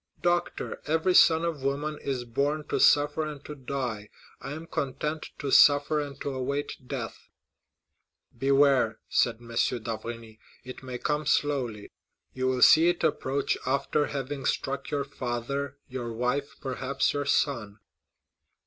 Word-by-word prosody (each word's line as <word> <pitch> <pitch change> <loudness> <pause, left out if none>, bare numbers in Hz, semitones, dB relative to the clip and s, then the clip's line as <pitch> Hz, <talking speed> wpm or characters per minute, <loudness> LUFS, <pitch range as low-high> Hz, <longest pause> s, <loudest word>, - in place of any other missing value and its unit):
"Doctor, 175 0 -1
every 160 +4 +2
son 165 -1 +6
of 165 -5 -3
woman 145 +3 -2
is 130 -3 -3
born 145 +6 -1
to - - 0
suffer 145 +2 +4
and 150 -2 -7
to 150 - -6
die; 125 -6 -4 0.3
I 135 - -5
am 160 +2 -7
content 150 +1 -3
to 140 -2 -3
suffer 145 +2 +6
and 140 -1 -7
to 140 - -2
await 135 +2 -3
death." 125 -5 -6 1.1
"Beware," 135 -4 +3
said 120 - +2
M. 115 +1 -15
d'Avrigny, 115 -1 -3 0.2
"it 130 0 -9
may 130 -1 -6
come 150 +2 -1
slowly; 130 -9 0 0.4
you 130 0 -1
will 130 -1 +2
see 160 +2 +8
it 175 - -1
approach 135 +1 0
after 140 +2 +1
having 140 0 -4
struck 140 0 -2
your 145 -1 -1
father, 140 +1 -4
your 125 -2 -5
wife, 125 +5 -2
perhaps 135 0 -1
your 145 0 -2
son." 115 -9 0
140 Hz, 140 wpm, -28 LUFS, 125-145 Hz, 1.1 s, see